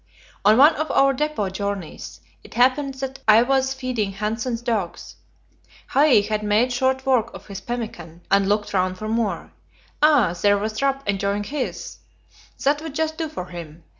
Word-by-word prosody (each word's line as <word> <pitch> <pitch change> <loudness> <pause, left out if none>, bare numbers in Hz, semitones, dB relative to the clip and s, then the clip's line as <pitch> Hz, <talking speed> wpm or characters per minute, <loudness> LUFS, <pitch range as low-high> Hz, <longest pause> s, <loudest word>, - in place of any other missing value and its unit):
On 210 +2 +5
one 290 +5 +7
of 310 +1 -2
our 275 0 +4
depot 300 -7 -1
journeys 200 -3 -5 0.2
it - - -14
happened 265 +3 +2
that 265 0 -6
I 220 +2 +7
was 265 +1 +1
feeding 245 -7 -2
Hanssen's 225 +4 -3
dogs. 205 -8 -3 0.7
Hai 280 -6 +5
had 210 +1 -2
made 215 +4 +2
short 260 +1 0
work 245 -4 +2
of - - -11
his 200 -1 -8
pemmican, 190 -8 -6
and 195 0 +3
looked 205 0 0
round 185 -1 0
for 215 - -6
more. 225 -2 -2 0.5
Ah! 280 - +4
there 205 0 +4
was 215 +3 -3
Rap 275 -2 0
enjoying 200 +1 0
his 275 +4 -5 0.6
that 290 +2 +2
would 315 -3 -7
just 315 0 -1
do 320 -2 -2
for 295 -12 -6
him. 170 -2 -10
230 Hz, 165 wpm, -22 LUFS, 200-270 Hz, 0.7 s, one